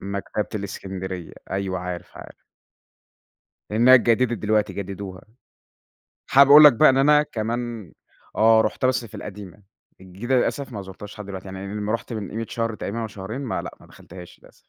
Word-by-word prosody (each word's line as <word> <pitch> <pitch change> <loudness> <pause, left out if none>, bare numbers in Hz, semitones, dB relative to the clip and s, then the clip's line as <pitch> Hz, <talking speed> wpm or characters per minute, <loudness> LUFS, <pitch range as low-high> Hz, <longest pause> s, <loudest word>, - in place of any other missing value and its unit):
مكتبة 100 +1 -4
الإسكندرية، 95 -3 -6 0.2
أيوه 95 -1 -2
عارف، 90 -1 -7
عارف. - - -11 1.4
إنها 120 +4 +6
اتجددت 120 -1 +3
دلوقتي 105 0 0
جددوها. 95 -1 -7 1.1
حابب 140 +1 +6
أقول 150 +2 +10
لك 150 -4 +9
بقى 155 +6 +6
إن 130 - +3
أنا 150 +2 +5
كمان 115 - -5 0.4
آه 110 0 +5
رُحتها 110 +4 0
بس 130 -2 0
في 110 - -12
القديمة، 100 -1 -10 0.4
الجديدة 100 +8 -3
للأسف 135 +2 -1
ما 100 - -5
زرتهاش 95 +2 -10
لحد 105 - -8
دلوقتي، 95 -1 -8
يعني 95 0 -8
أمّا 105 +1 -3
رُحت 115 - -4
من 105 -5 -5
قيمة 115 +1 -4
شهر 115 -2 -2
تقريبًا 115 +2 -5
أو 115 - -3
شهرين 105 +5 -7
ما 130 -5 -3
لأ، - - -9
ما - - -18
دخلتهاش 90 -1 -14
للأسف. - - -20
105 Hz, 165 wpm, -23 LUFS, 95-120 Hz, 1.4 s, أقول